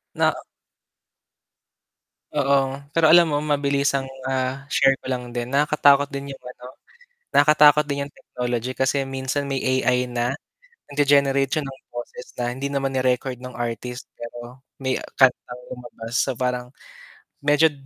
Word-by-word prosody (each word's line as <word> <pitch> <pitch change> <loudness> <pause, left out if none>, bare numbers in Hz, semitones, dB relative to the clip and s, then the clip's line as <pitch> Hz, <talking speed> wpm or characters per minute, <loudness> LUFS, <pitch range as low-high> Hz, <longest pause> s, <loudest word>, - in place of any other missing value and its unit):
Na - - +3 2.0
Oo, 140 -1 +1
pero 160 +2 +2
alam 170 -1 +7
mo, 145 - +1
mabilisang, 140 -2 0 0.2
ah, 130 +1 -2
share 135 -1 +4
ko - - -22
lang 125 -1 -3
din, 120 0 -3
nakakatakot 145 0 +4
din 140 0 -6
'yung - - -14
ano 125 0 -11 0.6
nakakatakot 150 0 +6
din 140 0 -2
'yung 145 - -15
technology 125 0 -4
kasi 135 +1 +1
minsan 135 +1 -3
may 135 - 0
AI 125 -1 +1
na, 120 +1 -1 0.6
nag-ge-generate 140 -1 +3
siya 155 - 0
ng 135 0 -9
boses 120 +1 -8
na 120 0 -1
hindi 135 +2 -3
naman 135 -1 -1
ni-record 130 -1 0
nung 125 -1 -8
artist 120 +1 -4
pero 120 +2 -9 0.2
may 130 -1 0 0.2
kantang 125 -2 +2
lumabas 120 -2 -9
so 135 -3 0
parang, 125 -1 -1 0.7
medyo 150 +2 +4
135 Hz, 140 wpm, -23 LUFS, 125-140 Hz, 2.0 s, alam